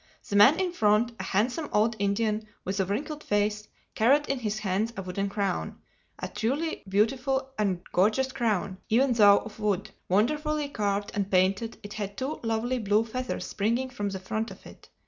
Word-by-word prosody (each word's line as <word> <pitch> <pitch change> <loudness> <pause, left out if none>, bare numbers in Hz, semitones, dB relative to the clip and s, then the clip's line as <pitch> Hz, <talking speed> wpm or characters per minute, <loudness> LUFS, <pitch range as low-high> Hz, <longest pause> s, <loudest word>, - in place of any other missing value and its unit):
The 205 - -3
man 220 - +7
in 370 -2 0
front, 215 -5 +3
a - - -3
handsome 245 - 0
old 220 +2 +2
Indian 215 +2 0 0.2
with 195 +2 -2
a 190 - +2
wrinkled 290 - -3
face, 210 0 0 0.3
carried 280 +7 +3
in 275 -1 -1
his 215 -3 -2
hands 215 +2 -1
a 195 - -3
wooden 195 +2 -2
crown—a 200 -2 -5
truly 285 +8 -2
beautiful 265 +6 +1
and 190 -4 0
gorgeous 215 +8 +2
crown, 210 -7 -1
even 250 +3 +3
though 205 -3 +7
of 220 - -7
wood. 205 -3 -1 0.2
Wonderfully 300 - +1
carved 205 -5 -1
and 200 -2 -1
painted, 195 +4 +1
it 205 0 -8
had 205 -1 -5
two 270 +4 -3
lovely 230 +2 -1
blue 215 +1 +2
feathers 255 +3 -4
springing 235 +6 -1
from 205 -5 -3
the 195 - -4
front 220 +4 -3
of - - -13
it. - - -14
215 Hz, 175 wpm, -27 LUFS, 200-255 Hz, 0.3 s, man